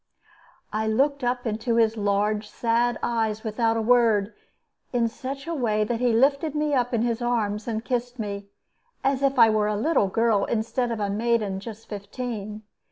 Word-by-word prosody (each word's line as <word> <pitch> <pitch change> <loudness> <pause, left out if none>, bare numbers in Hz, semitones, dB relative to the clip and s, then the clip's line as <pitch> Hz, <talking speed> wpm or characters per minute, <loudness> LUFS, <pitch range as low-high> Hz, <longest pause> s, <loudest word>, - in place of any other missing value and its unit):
I 220 +1 0
looked 275 +5 +1
up 245 0 -1
into 225 +1 -1
his 225 -1 +3
large, 210 0 0
sad 235 0 +1
eyes 220 -2 -1
without 225 +1 0
a 225 - 0
word, 225 -3 +3 0.6
in 240 -2 +2
such 270 +4 -6
a 335 - -3
way 220 -7 +1
that 230 +2 -2
he 245 -1 +2
lifted 280 +6 +2
me 300 -1 0
up 245 -2 +1
in 235 -2 +1
his 235 0 -1
arms 220 -3 -1
and 225 0 -3
kissed 245 0 -2
me, 200 -2 -5 0.6
as 275 -1 +1
if 275 -1 +1
I 230 -2 +7
were 215 -1 +2
a 210 - 0
little 220 -3 +2
child 225 -1 +2
instead 235 +2 -1
of 230 - -3
a 200 -1 -1
maiden 215 -2 0
just 220 +1 -9
fifteen. 210 0 -6
230 Hz, 180 wpm, -25 LUFS, 215-245 Hz, 0.6 s, I